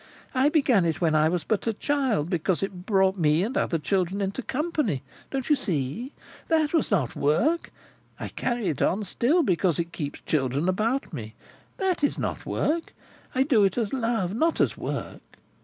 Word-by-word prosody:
"I 265 +2 +4
began 270 - +3
it 165 -2 0
when 165 -3 +2
I 155 0 +4
was 175 -1 -1
but 220 +1 -1
a 225 - +2
child, 260 - 0
because 175 +1 0
it 185 -1 -5
brought 190 -2 +3
me 155 +1 +3
and 240 +7 -3
other 170 - +1
children 185 +3 0
into 195 +5 -2
company, 270 - -1 0.3
don't 270 -2 -3
you 300 - +5
see? 185 - -2 0.4
That 315 -2 +2
was 325 - +2
not 150 - 0
work. 290 - +1 0.5
I - - -4
carry 240 -3 -2
it 150 - -3
on 205 +4 +2
still, 270 - +2
because 180 - +1
it 170 0 -2
keeps 145 -3 -4
children 140 +2 0
about 215 +6 0
me. 110 -6 -6 0.4
That 370 -5 0
is 290 - +2
not - - -3
work. 325 +2 -1 0.4
I 260 - +4
do 255 -7 +4
it 195 +1 +2
as 225 -2 -1
love, 225 -7 0
not 320 +9 +1
as - - +2
work. - - -5
200 Hz, 185 wpm, -26 LUFS, 170-270 Hz, 0.5 s, you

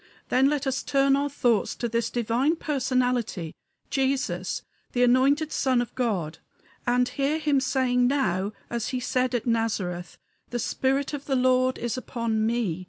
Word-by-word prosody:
Then 265 +2 +4
let 290 -1 -1
us 270 0 0
turn 275 0 +3
our 285 +1 0
thoughts 240 -6 +1
to 240 - -2
this 230 0 -1
divine 240 +6 +1
Personality, 250 - -1 0.4
Jesus, 260 -10 -1 0.3
the 245 - +2
anointed 275 +5 +3
Son 260 -2 +2
of 240 - -3
God, 195 -11 -2 0.5
and 245 +1 +3
hear 280 +4 0
him 295 -3 +2
saying 255 -1 +2
now, 205 -8 0 0.2
as 235 -2 -3
he 255 - -2
said 255 0 0
at 235 - -1
Nazareth: 205 -7 -1 0.3
"The 240 - -2
spirit 270 +4 0
of 285 -1 -5
the 270 - 0
Lord 255 0 +3
is 240 0 -3
upon 225 -3 -1
ME. 225 -8 -1
250 Hz, 160 wpm, -26 LUFS, 230-270 Hz, 0.5 s, Then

